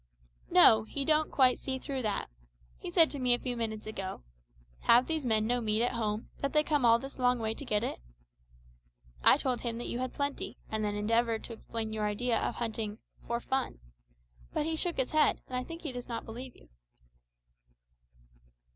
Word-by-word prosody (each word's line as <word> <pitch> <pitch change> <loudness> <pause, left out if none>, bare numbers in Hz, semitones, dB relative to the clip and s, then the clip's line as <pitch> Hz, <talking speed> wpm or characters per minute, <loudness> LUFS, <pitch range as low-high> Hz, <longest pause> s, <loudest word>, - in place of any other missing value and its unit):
"No, 220 -1 +8
he 275 +6 -3
don't 310 +1 +3
quite 255 -2 +4
see 265 -1 -3
through 270 0 -4
that. 215 -4 -1 0.5
He - - -6
said 320 - +5
to 285 - -5
me 250 -1 +4
a - - -6
few 250 -2 -3
minutes 220 -2 -3
ago, 195 - -6 0.6
`Have 240 +2 +6
these 315 -5 -2
men 215 -2 +2
no 245 +2 +1
meat 215 0 +1
at 245 - +1
home, 215 -2 -2
that 280 - -2
they 300 0 +4
come 295 -5 +1
all 230 0 +6
this 270 +3 -9
long 250 0 +3
way 220 -1 -2
to 255 - -8
get 210 -5 0
it?' - - -3 1.2
I - - +7
told 255 -2 -1
him 230 -2 -2
that 240 - -5
you 240 - -3
had 255 0 -2
plenty, 285 0 -3
and 220 0 -1
then 205 0 -1
endeavoured 230 +2 +1
to 235 - -6
explain 220 -1 -5
your 215 -1 -1
idea 230 +3 0
of - - -2
hunting 220 -2 -3 0.3
`for 235 0 0
fun.' 265 0 -1 0.7
But - - -1
he 320 0 -1
shook 345 +2 0
his 265 -1 0
head, 310 -1 +3
and 255 - -5
I 250 - -1
think 330 +5 -9
he 300 - -3
does 245 -1 -7
not 235 -2 -5
believe 245 +3 -8
you." - - -20
240 Hz, 200 wpm, -31 LUFS, 220-265 Hz, 1.2 s, No